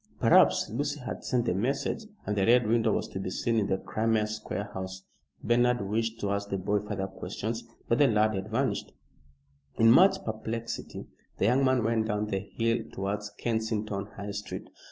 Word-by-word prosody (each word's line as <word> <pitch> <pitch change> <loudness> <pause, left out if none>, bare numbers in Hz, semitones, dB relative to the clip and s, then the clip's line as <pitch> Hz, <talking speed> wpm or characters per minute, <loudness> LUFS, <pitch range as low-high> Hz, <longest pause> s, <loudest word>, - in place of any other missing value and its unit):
Perhaps - - +5
Lucy 145 +5 -2
had 125 - -6
sent 125 -2 0
the 100 - +1
message, 135 - -1 0.2
and 105 - -1
the 100 - +2
Red 120 +3 +5
Window 115 0 +2
was - - -1
to 95 - -5
be 95 - -3
seen 115 +5 0
in 100 - 0
the 95 -1 +1
Crimea 110 +2 0
Square 105 -1 -5
house. 95 0 -6 0.4
Bernard 120 -2 +2
wished 115 +2 -1
to 100 - 0
ask 100 0 -2
the 100 - -1
boy 100 +2 0
further 105 -2 -3
questions, 110 +4 -5 0.2
but 115 - +2
the 145 - +6
lad 110 -2 +3
had 95 +1 -4
vanished. 130 +4 -1 0.8
In 115 0 +6
much 190 +8 +5
perplexity 110 +1 -4 0.3
the - - +1
young 125 +5 +3
man 130 -3 +3
went 110 0 +1
down 105 0 0
the 100 -2 -1
hill 115 +4 -1
towards 100 +2 -3
Kensington 110 -3 -2
High 100 0 -5
Street. 105 +1 -6
110 Hz, 185 wpm, -29 LUFS, 100-115 Hz, 0.8 s, the